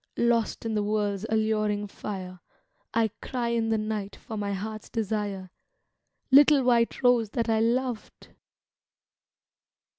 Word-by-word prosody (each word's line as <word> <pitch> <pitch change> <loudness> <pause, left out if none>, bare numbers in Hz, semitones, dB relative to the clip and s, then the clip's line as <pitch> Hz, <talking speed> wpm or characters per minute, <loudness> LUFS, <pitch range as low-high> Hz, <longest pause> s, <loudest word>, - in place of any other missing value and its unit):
Lost 235 -1 +1
in 225 - -1
the 210 - +1
world's 205 0 -1
alluring 215 -1 +1
fire, 185 -3 -7 0.5
I 225 -2 +1
cry 245 -2 -2
in 230 -1 0
the 225 - +2
night 215 -2 -3
for 225 - -9
my 205 -1 -2
heart's 215 +2 -5
desire, 205 -4 -3 0.8
Little 285 0 +7
white 240 +1 +2
rose 245 -3 +4
that 230 +2 -2
I 220 -1 +3
loved 240 0 -2
220 Hz, 125 wpm, -27 LUFS, 205-235 Hz, 0.8 s, Little